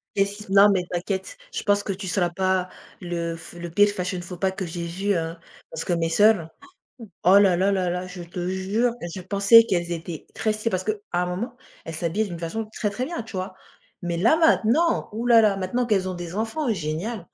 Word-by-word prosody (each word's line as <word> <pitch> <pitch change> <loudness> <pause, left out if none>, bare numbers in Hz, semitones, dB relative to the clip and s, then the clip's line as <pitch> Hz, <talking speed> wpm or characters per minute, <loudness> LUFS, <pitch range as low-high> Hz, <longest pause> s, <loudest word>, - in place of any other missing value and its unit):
Qu'est-ce 200 +1 +1
qui 210 - -9
s - - -18
non 200 +1 +7
mais 190 -2 +2
t'inquiète. 190 - -3 0.2
Je 450 - -3
pense 205 0 +3
que 200 - -4
tu 190 0 -7
seras 180 -1 +1
pas 185 +1 0 0.3
le 170 -2 -3
f 165 0 -11
le 175 0 -7
pire 205 +4 +5
fashion 185 -2 -3
faux 175 +1 -8
pas 190 +1 +1
que 190 0 -5
j'ai 170 0 -5
vu 195 +4 -1
hein, 165 0 -3 0.3
parce 160 0 -5
que 175 - 0
mes 165 -1 0
sœurs. 205 -2 +4 0.8
Oh 190 +3 +7
là 195 -3 +5
là 195 +3 +2
là 185 -2 0
là, 180 +1 -3
je 180 -1 -8
te 175 +1 -5
jure 200 +6 0
et 170 - -4
je 190 - -6
pensais 200 +4 +6
qu'elles 175 -5 -1
étaient 165 -1 -5
très 215 -1 0
stylées, 215 +2 -2
parce 185 -2 -2
qu'à 215 - +1 0.2
un 180 0 +1
moment 210 +8 -4 0.3
elles 165 - -6
s'habillaient 175 +7 -1
d'une 175 -2 -6
façon 175 +7 -4
très 210 - -2
très 225 +5 -3
bien, 330 -7 -5
tu 225 - -12
vois? 185 0 -4 0.5
Mais 170 -1 -2
là 315 - +4
maintenant? 320 0 +3
Ouh 230 +3 -3
là 235 -1 +7
là, 210 -3 +3
maintenant 195 +6 -1
qu'elles 195 -5 +1
ont 185 - -3
des 175 0 -7
enfants, 230 +5 -1
génial! 175 +4 -4
190 Hz, 230 wpm, -24 LUFS, 175-215 Hz, 0.8 s, non